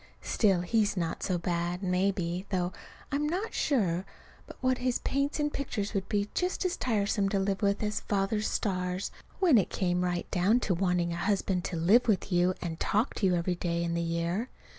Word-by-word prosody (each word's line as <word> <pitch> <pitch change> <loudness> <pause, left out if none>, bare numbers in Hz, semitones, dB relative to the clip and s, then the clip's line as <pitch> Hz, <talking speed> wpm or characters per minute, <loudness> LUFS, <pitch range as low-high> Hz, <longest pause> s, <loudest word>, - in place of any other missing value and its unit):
Still, 195 -5 +2
he's 205 +2 +1
not 170 -2 -2
so 185 - 0
bad, 175 +1 -2
maybe; 180 -1 0
though 180 -1 -1 0.4
I'm 295 +1 0
not 380 +7 -2
sure 190 - +1 0.4
but - - -11
what 255 -1 +1
his 250 -1 +1
paints 280 +3 -1
and 295 0 0
pictures 215 -7 -3
would 195 -2 -2
be 205 -1 +1
just 365 +1 -1
as 360 - +1
tiresome 205 -4 0
to 200 - 0
live 195 +1 0
with 200 +1 +1
as 210 0 -1
Father's 205 +1 0
stars, 185 -2 -1 0.3
when 330 - +5
it 190 - 0
came 180 -1 0
right 175 -1 -1
down 200 +6 +3
to 195 - +1
wanting 175 -1 +1
a - - -4
husband 195 -1 0
to 175 - -3
live 205 +10 +4
with 200 -2 +1
you 180 +1 +3
and 165 -2 -4
talk 215 +6 +1
to 195 - +1
you 180 - +3
every 175 +1 0
day 170 -1 -1
in 170 0 -1
the 170 - 0
year. 170 +7 -1
195 Hz, 200 wpm, -29 LUFS, 175-220 Hz, 0.4 s, when